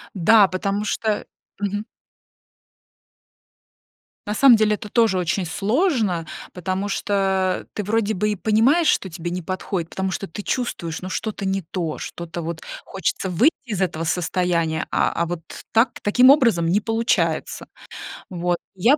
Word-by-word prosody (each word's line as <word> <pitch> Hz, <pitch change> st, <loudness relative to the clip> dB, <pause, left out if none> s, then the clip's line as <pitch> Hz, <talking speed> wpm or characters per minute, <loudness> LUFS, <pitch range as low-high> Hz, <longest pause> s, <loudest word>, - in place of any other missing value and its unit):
Да, 205 Hz, +3 st, +6 dB
потому 200 Hz, +2 st, -2 dB
что 215 Hz, 0 st, -1 dB, 0.3 s
Мгм. 205 Hz, +1 st, -2 dB, 2.4 s
На 210 Hz, -, -1 dB
самом 255 Hz, +2 st, +7 dB
деле, 215 Hz, -1 st, +3 dB
это 210 Hz, -, -9 dB
тоже 225 Hz, -4 st, +3 dB
очень 180 Hz, +1 st, 0 dB
сложно. 210 Hz, -, 0 dB, 0.3 s
Потому 185 Hz, +3 st, -3 dB
что, 205 Hz, +1 st, -2 dB
а, 190 Hz, -2 st, +1 dB
ты 210 Hz, -, -3 dB
вроде 220 Hz, +1 st, 0 dB
бы 210 Hz, +2 st, 0 dB
и -, -, -1 dB
понимаешь, 230 Hz, -, +3 dB
что 190 Hz, -, +2 dB
тебе 170 Hz, 0 st, -5 dB
не 180 Hz, +1 st, -3 dB
подходит, 180 Hz, -1 st, -3 dB
потому 190 Hz, +1 st, -2 dB
что 195 Hz, -, -4 dB
ты 190 Hz, -, -7 dB
чувствуешь, 175 Hz, -11 st, -3 dB
ну, 185 Hz, -, -6 dB
что-то 210 Hz, 0 st, -3 dB
не 195 Hz, 0 st, 0 dB
то, 165 Hz, -2 st, -4 dB
что-то 170 Hz, 0 st, -6 dB
вот 165 Hz, 0 st, -5 dB, 0.2 s
хочется 190 Hz, 0 st, -2 dB
выйти 235 Hz, -, +4 dB
из 210 Hz, -6 st, -3 dB
этого 165 Hz, -3 st, -1 dB
состояния, 170 Hz, -1 st, 0 dB
а, -, -, +2 dB
а, 170 Hz, -, 0 dB
вот 170 Hz, -1 st, -4 dB, 0.3 s
так 225 Hz, +3 st, +3 dB
таким 250 Hz, +5 st, +5 dB
образом 230 Hz, -, +5 dB
не 200 Hz, +5 st, +2 dB
получается. 225 Hz, +2 st, 0 dB, 0.6 s
Вот 175 Hz, -1 st, -1 dB, 0.2 s
и 185 Hz, -, -15 dB
я 270 Hz, +6 st, +6 dB
195 Hz, 155 wpm, -22 LUFS, 175-215 Hz, 2.4 s, самом